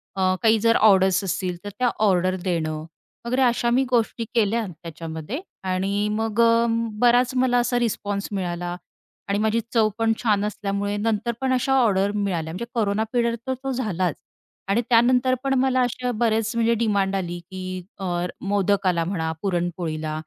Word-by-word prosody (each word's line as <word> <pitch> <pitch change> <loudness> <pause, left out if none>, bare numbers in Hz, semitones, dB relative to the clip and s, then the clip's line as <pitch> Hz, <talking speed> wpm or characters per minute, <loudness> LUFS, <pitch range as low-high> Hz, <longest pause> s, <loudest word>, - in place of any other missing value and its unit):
अ, 185 -1 +2
काही 220 0 +5
जर 230 +2 +3
ऑर्डर्स 190 -2 +4
असतील 185 -1 -2
तर 205 - -5
त्या 250 - +3 0.2
ऑर्डर 185 -1 +2
देणं, 160 -4 -2 0.4
वगैरे 255 +3 0
अशा 240 -1 +2
मी 255 +3 +3
गोष्टी 235 -1 0
केल्या 225 +1 +2
त्याच्यामध्ये 165 - -7 0.3
आणि 195 +3 0
मग 220 +1 0
अ, 230 0 +4 0.3
बराच 245 +1 +4
मला 255 -1 +3
असा 245 0 +1
रिस्पॉन्स 205 -3 -2
मिळाला 175 -2 -3 0.5
आणि 200 - +1
माझी 220 +1 +1
चव 220 -2 +4
पण 225 -1 +2
छान 210 -3 +2
असल्यामुळे 205 -1 -2
नंतर 220 +2 0
पण 260 -1 +1
अशा 255 +1 +1
ऑर्डर 200 -3 +2
मिळाल्या. 175 -6 -2
म्हणजे 190 +7 -4
कोरोना 215 -2 +1
पिरियड 235 -1 +1
तर 260 - +1
तो 270 - -2
झालाच 185 - -1 0.5
आणि 210 +5 +3
त्यानंतर 250 +2 +4
पण 270 - +1
मला 260 -1 +2
अशा 250 0 -1
बरेच 225 -1 +1
म्हणजे 230 0 +2
डिमांड 200 -3 +1
आली, 175 -2 -3
की 185 0 -7 0.2
अ, 175 -2 -1 0.2
मोदकाला 195 -3 +1
म्हणा, 165 -3 -2
पुरणपोळीला 170 -4 -2
205 Hz, 160 wpm, -23 LUFS, 185-235 Hz, 0.5 s, काही